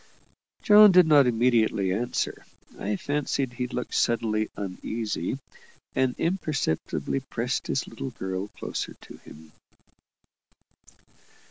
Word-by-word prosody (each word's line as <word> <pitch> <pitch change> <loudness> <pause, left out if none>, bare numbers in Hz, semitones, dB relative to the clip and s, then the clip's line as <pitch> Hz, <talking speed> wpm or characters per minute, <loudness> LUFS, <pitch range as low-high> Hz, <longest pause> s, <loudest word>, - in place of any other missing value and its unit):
John 210 -1 +8
did 180 -1 +7
not 145 -4 +6
immediately 115 -5 +2
answer; 120 +5 -2 0.4
I 105 +1 -1
fancied 140 0 -2
he 125 0 -3
looked 125 0 -5
suddenly 110 -2 +1
uneasy, 105 +5 -3 0.6
and 130 -1 +1
imperceptibly 155 - -1
pressed 125 -1 -3
his 135 - -1
little 135 - -6
girl 95 -4 -4
closer - - -6
to - - -14
him. 80 0 -15
125 Hz, 105 wpm, -26 LUFS, 105-135 Hz, 0.6 s, John